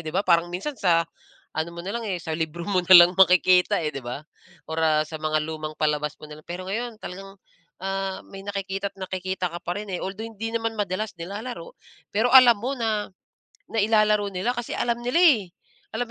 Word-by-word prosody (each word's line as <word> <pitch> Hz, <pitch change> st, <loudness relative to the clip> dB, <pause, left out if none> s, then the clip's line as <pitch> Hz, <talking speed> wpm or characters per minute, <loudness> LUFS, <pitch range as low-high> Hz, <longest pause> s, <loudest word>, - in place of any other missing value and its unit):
di 155 Hz, -, -5 dB
ba? 195 Hz, +4 st, 0 dB
Parang 170 Hz, -1 st, +3 dB
minsan 195 Hz, +12 st, -4 dB
sa 170 Hz, -6 st, +2 dB, 0.5 s
ano 160 Hz, +1 st, -1 dB
mo 170 Hz, -, -7 dB
na 180 Hz, -, -7 dB
lang, 235 Hz, -, -5 dB
eh, 190 Hz, -5 st, -3 dB
sa 160 Hz, -2 st, -4 dB
libro 165 Hz, +1 st, -4 dB
mo 185 Hz, -3 st, +1 dB
na 185 Hz, -, +4 dB
lang 180 Hz, -, -6 dB
makikita, 180 Hz, -1 st, +5 dB
eh, 155 Hz, -, -1 dB
'di 135 Hz, -, -6 dB
ba? 120 Hz, +3 st, -5 dB, 0.5 s
Or, 160 Hz, -, -4 dB
ah, 155 Hz, -1 st, +3 dB
sa 160 Hz, -, -6 dB
mga 155 Hz, 0 st, 0 dB
lumang 155 Hz, 0 st, -5 dB
palabas 150 Hz, -1 st, 0 dB
mo 150 Hz, -, -11 dB
na 150 Hz, -, -10 dB
lang, -, -, -30 dB
pero 185 Hz, +2 st, -6 dB
ngayon 225 Hz, +2 st, -4 dB
talagang, 195 Hz, +2 st, -9 dB, 0.4 s
ah, 195 Hz, 0 st, -3 dB
may 195 Hz, 0 st, -10 dB
nakikita't-nakikita 190 Hz, -2 st, -4 dB
ka 175 Hz, -, -5 dB
pa 175 Hz, -, -2 dB
rin, 210 Hz, 0 st, -7 dB
eh. -, -, -1 dB
Although, 195 Hz, +4 st, -5 dB
hindi 225 Hz, 0 st, -5 dB
naman 225 Hz, -1 st, -2 dB
madalas 205 Hz, +1 st, -2 dB
nilalaro, 215 Hz, -, -7 dB, 0.4 s
pero 220 Hz, +4 st, +2 dB
alam 250 Hz, -3 st, +9 dB
mo 260 Hz, +4 st, -2 dB
na 220 Hz, -3 st, -1 dB, 0.6 s
nailalaro 215 Hz, -1 st, +3 dB
nila 190 Hz, +6 st, -1 dB
kasi 240 Hz, -1 st, -4 dB
alam 235 Hz, 0 st, -1 dB
nila, 250 Hz, +7 st, +1 dB
eh. 230 Hz, -, +5 dB, 0.5 s
Alam 245 Hz, +2 st, -1 dB
190 Hz, 200 wpm, -24 LUFS, 170-220 Hz, 0.6 s, alam